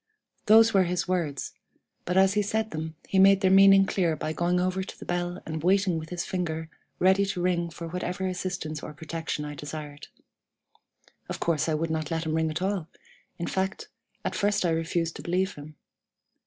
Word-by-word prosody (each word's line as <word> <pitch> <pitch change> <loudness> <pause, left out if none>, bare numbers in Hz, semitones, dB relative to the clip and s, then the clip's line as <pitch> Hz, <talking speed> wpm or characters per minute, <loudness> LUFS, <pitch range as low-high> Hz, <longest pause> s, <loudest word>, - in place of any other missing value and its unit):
"Those 225 +1 +7
were 190 -2 +4
his 180 +1 -1
words, 165 -7 -2 0.5
but 180 +1 0
as 190 0 +5
he 210 - +2
said 220 +2 -1
them 160 0 -5
he 190 - +1
made 195 0 +6
their 190 -2 +3
meaning 195 0 +7
clear 175 -4 0
by 155 +1 -3
going 175 +2 +1
over 185 +1 0
to 190 - -8
the - - -9
bell, 175 +1 -2
and 160 -1 -4
waiting 185 -1 +2
with 160 0 -9
his 175 -1 -3
finger 160 -3 -3 0.3
ready 190 +2 +4
to 195 -2 -2
ring 175 -1 0
for 170 0 -7
whatever 180 +2 -3
assistance 180 -4 -3
or - - -7
protection 160 -1 -4
I 150 - -6
desired. 145 0 -8 1.2
Of - - -4
course 165 -1 0
I 155 - +1
would 160 +1 -2
not 155 -2 -2
let 165 0 -2
him 155 - -1
ring 160 0 +1
at 155 +4 -3
all; 190 -4 -1 0.5
in 170 - -3
fact, 190 +2 -2 0.4
at - - -1
first 205 -2 +1
I 170 - +2
refused 165 0 -1
to - - -8
believe 185 +2 0
him. 150 +1 -11
175 Hz, 195 wpm, -27 LUFS, 160-190 Hz, 1.2 s, Those